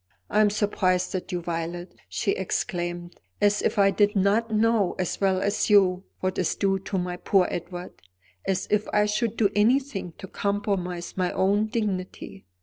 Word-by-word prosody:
"I 215 - +4
am 210 - +5
surprised 190 -3 0
at 185 +1 -4
you, 175 -1 -3
Violet!" 170 +1 -4 0.2
she 95 +1 -1
exclaimed; 175 -2 -3 0.2
"as 205 0 +3
if - - 0
I 195 -1 +5
did 205 +1 +2
not 205 +4 +2
know, 220 -3 +2
as 185 +1 -3
well 190 -1 +2
as 200 +3 0
you, 190 -2 +4 0.2
what 185 0 -1
is 180 - 0
due 195 -1 +1
to 195 +1 -4
my 180 0 -2
poor 185 0 +2
Edward; 175 +1 -6 0.4
as 185 -1 -1
if 210 0 +2
I 210 0 +3
should 215 +2 -1
do 205 -3 +3
anything 220 -4 +1
to - - -8
compromise 190 -3 -2
my 180 -1 +1
own 205 +3 +2
dignity. 190 - -4
195 Hz, 170 wpm, -25 LUFS, 180-210 Hz, 0.4 s, am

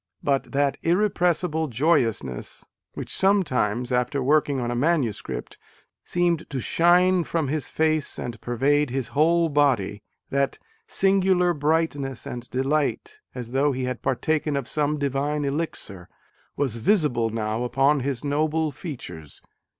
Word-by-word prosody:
But 140 -1 0
that 140 0 +1
irrepressible 175 -3 +1
joyous 130 - +2
ness 65 -3 -8 0.3
which - - -6
sometimes, 130 - +1
after 125 +2 0
working 145 0 +2
on 120 -1 -2
a - - -2
manuscript, 135 - -1 0.4
seemed 175 -2 0
to 135 - -3
shine 175 +6 +3
from 160 -4 -1
his 155 0 -2
face 155 -2 0
and 115 -2 -6
pervade 140 +4 +1
his 130 0 -3
whole 165 +3 +3
body, 130 -9 +1 0.3
that 140 0 0 0.3
"singular 190 -2 +3
bright 160 +1 +1
ness 135 -3 -5
and 120 0 -7
delight, 150 - -1 0.2
as 120 -2 -6
though 140 +2 +2
he 130 0 -3
had 125 0 -3
partaken 150 +3 0
of 135 -3 -3
some 150 0 0
divine 145 +1 -1
elixir" 140 - -4 0.5
was 130 -5 -1
visible 125 - +2
now 110 +1 -2
upon 135 +4 +2
his 135 -2 -3
noble 155 +2 0
features. 130 - -9
145 Hz, 135 wpm, -24 LUFS, 125-160 Hz, 0.5 s, shine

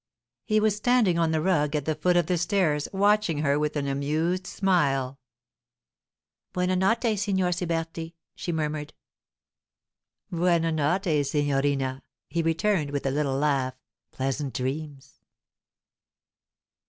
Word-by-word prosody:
He 215 -1 +3
was 215 -1 +2
standing 210 -5 +2
on 165 -1 +2
the 160 -1 0
rug 155 -5 +1
at 145 -2 -1
the 155 - +1
foot 175 +4 +2
of 175 - +3
the 180 0 0
stairs, 170 -5 +1
watching 200 -5 +2
her 140 0 +2
with 150 0 -1
an 140 -1 -1
amused 155 +7 -1
smile. 140 -9 +1 1.3
'Buona 180 0 +1
notte, 220 +3 +1
Signor 190 -3 +1
Siberti,' 165 -1 -3 0.2
she 175 - -4
murmured. 150 -2 -3 1.4
'Buona 170 -1 +2
notte, 160 0 +1
signorina,' 140 -2 0 0.3
he 170 - +1
returned, 165 0 +1
with 140 -1 -3
a 135 - +1
little 140 -1 0
laugh. 135 -3 0 0.4
'Pleasant 135 +1 -3
dreams! 140 +2 -5
160 Hz, 125 wpm, -26 LUFS, 145-180 Hz, 1.4 s, He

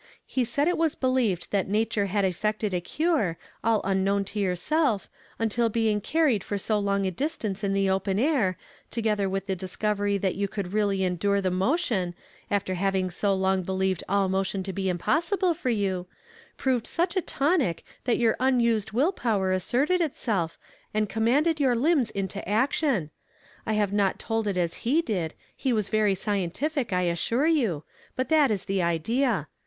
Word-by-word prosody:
He 260 - 0
said 280 +6 0
it 355 - +1
was 325 -2 +2
believed 250 -9 0
that 200 -2 +1
nature 210 -1 +1
had 200 +1 +1
effected 210 +2 -1
a 180 - 0
cure, 285 - 0 0.3
all 225 -1 +3
unknown 195 +1 +1
to 210 - -5
yourself, 205 - +1 0.3
until 225 +1 +1
being 220 -2 +1
carried 275 -4 +2
for 205 - -3
so 210 +2 0
long 200 -1 0
a 190 - 0
distance 215 - -3
in 195 -1 +1
the 195 0 +2
o[)en 190 0 0
air, 230 - +2 0.3
together 210 -4 0
with 195 +1 -2
the 195 -1 -1
discovery 200 +2 -1
that 190 -1 0
you 200 +1 -1
could 195 -2 -5
really 200 -2 +1
endure 190 +2 +1
the 190 -2 0
mo 195 - +2
tion, 185 - -1 0.3
after 200 -2 0
having 190 0 0
so 195 +3 +1
long 190 0 +1
believed 190 0 -1
all 200 0 +2
motion 190 0 -1
to 190 0 -5
be 190 0 -1
impossible 340 - +1
for 310 -6 -3
you, 190 -5 -1 0.5
proved 255 -4 0
such 345 +3 -1
a 375 - +2
tonic 280 - 0 0.2
that 245 - +2
your 230 -2 +3
unused 235 -5 +2
will 280 - +3
power 205 - 0
asserted 260 - +1
itself, 215 - -1 0.4
and 215 -1 +1
com 225 0 0
manded 305 +6 +3
your 260 -4 +3
lind)s 270 -1 +2
into 195 0 -4
action. 230 - +1 0.6
I 220 - +1
liave 205 -2 +1
not 200 -2 +1
told 225 -1 -2
it 195 -3 -1
as 170 -2 0
he 295 +8 +2
did; 180 - -2 0.2
he 265 - -1
was 215 -4 0
very 215 -2 +2
scientific, 210 - -2
I 180 0 +1
assure 180 - +1
you, 235 - +1 0.3
but 255 - -2
that 305 -4 +5
is 200 -3 -1
the 195 -1 0
idea. 180 - +1
205 Hz, 180 wpm, -26 LUFS, 190-250 Hz, 0.6 s, that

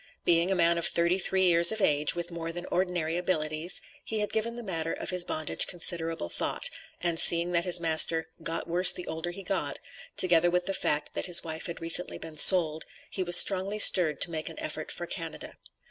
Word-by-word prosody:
Being 170 +1 +2
a 195 - 0
man 170 -1 +1
of 170 - +2
thirty 170 +2 +1
three 190 +1 +2
years 170 0 +6
of 220 - -4
age, 150 -5 +2
with 175 0 -6
more 165 -1 -7
than 175 +1 -8
ordinary 175 -3 -3
abilities, 160 -1 -2 0.2
he 220 - -4
had 210 - -4
given 230 +2 -3
the 240 - -9
matter 165 -5 -4
of - - -7
his 180 -1 +1
bondage 155 -3 -1
considerable 165 - -1
thought, - - -4 0.3
and 170 -2 -2
seeing 170 +1 +5
that 170 0 -1
his 180 -1 +5
master 160 0 +1
"got 165 +1 -5
worse 175 +2 +4
the 180 - -9
older 160 +2 -6
he 195 +3 -9
got," 190 +1 -4 0.4
together 175 -1 +3
with 180 0 -2
the 195 - -3
fact, 150 -5 -3
that - - -2
his 175 -1 +6
wife 160 +1 -7
had 170 - -9
recently 165 +2 0
been 160 -1 -11
sold, 160 -1 +4 0.3
he 190 - -5
was 175 -1 +5
strongly 195 +1 +3
stirred 180 -7 +4
to 170 - +2
make 155 -1 -6
an - - -13
effort - - -5
for - - -7
Canada. - - -7
170 Hz, 210 wpm, -26 LUFS, 165-180 Hz, 0.4 s, years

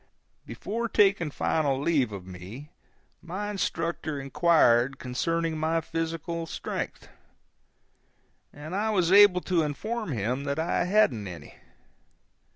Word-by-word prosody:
Before 235 +3 -4
taking 195 -7 +3
final 140 -2 0
leave 140 -6 +1
of 95 -3 -7
me, 95 - -10 0.5
my 195 +4 -4
instructor 165 -6 -2
inquired 135 -3 +3
concerning 160 +6 -2
my 160 +1 +1
physical 165 +1 -4
strength, - - -5 1.4
and 155 +5 -8
I 215 +2 0
was 185 -5 +1
able 200 -2 +7
to 180 -3 +1
inform 210 +7 -3
him 125 +3 -2
that 140 0 -2
I 165 +2 0
hadn't 180 - +2
any. 90 -2 -10
165 Hz, 115 wpm, -27 LUFS, 135-180 Hz, 1.4 s, able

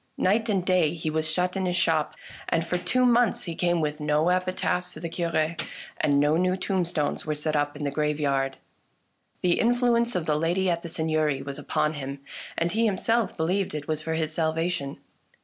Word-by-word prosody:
Night 225 +4 +2
and 190 -4 +1
day 175 -4 +3
he 160 -1 -3
was 160 0 0
shut 180 +3 0
in 190 -1 0
his 180 - 0
shop, 160 -4 +1 0.3
and 165 - +1
for 180 +1 -1
two 255 +7 +2
months 240 -2 +3
he 170 - -3
came 175 0 +1
with 150 0 -2
no 150 +2 +2
epitaphs 180 0 0
for - - -9
the 170 - -4
Cure, 165 -1 0 0.4
and 140 -1 +2
no 150 +2 +3
new 185 +1 +1
tombstones 175 -7 -1
were 155 - 0
set 155 +1 -1
up 145 0 0
in 145 - -6
the 140 - -1
graveyard. 140 -2 0 0.9
The 175 -1 +3
influence 240 0 +2
of 175 -3 -1
the 150 -1 +1
lady 175 +3 +1
at 170 0 -1
the 170 - -7
Seigneury 155 -4 0
was 140 +1 -6
upon 155 +1 0
him, 140 -2 -5 0.4
and 170 +1 +1
he 225 +2 +2
himself 225 +2 +1
believed 180 +2 0
it 150 -1 -5
was 155 -1 -1
for 160 +1 -2
his 160 -1 -1
salvation. 160 -2 -1
165 Hz, 200 wpm, -26 LUFS, 150-185 Hz, 0.9 s, day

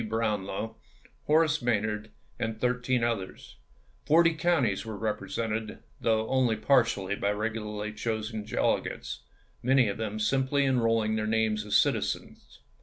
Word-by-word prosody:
Brownlow, 110 0 -2 0.5
Horace 155 0 +3
May 120 -3 +2
nard, 105 0 -4 0.3
and 110 -1 -3
thirteen 125 0 +1
others; 115 -6 -3 0.5
forty 165 +2 +5
counties 155 - +1
were 110 -2 -6
represented, 110 +1 -3 0.2
though 110 -1 +1
only 130 -3 +2
partially 110 -5 +2
by 100 - -1
regularly 105 0 -3
chosen 110 -1 -3
delegates, 105 - -1 0.4
many 130 -1 +4
of 100 - -3
them 110 -1 -3
simply 135 +5 +1
enrolling 115 -4 +2
their 110 0 -1
names 110 -1 +1
as 105 - 0
citizens. - - 0
110 Hz, 125 wpm, -28 LUFS, 105-125 Hz, 0.5 s, forty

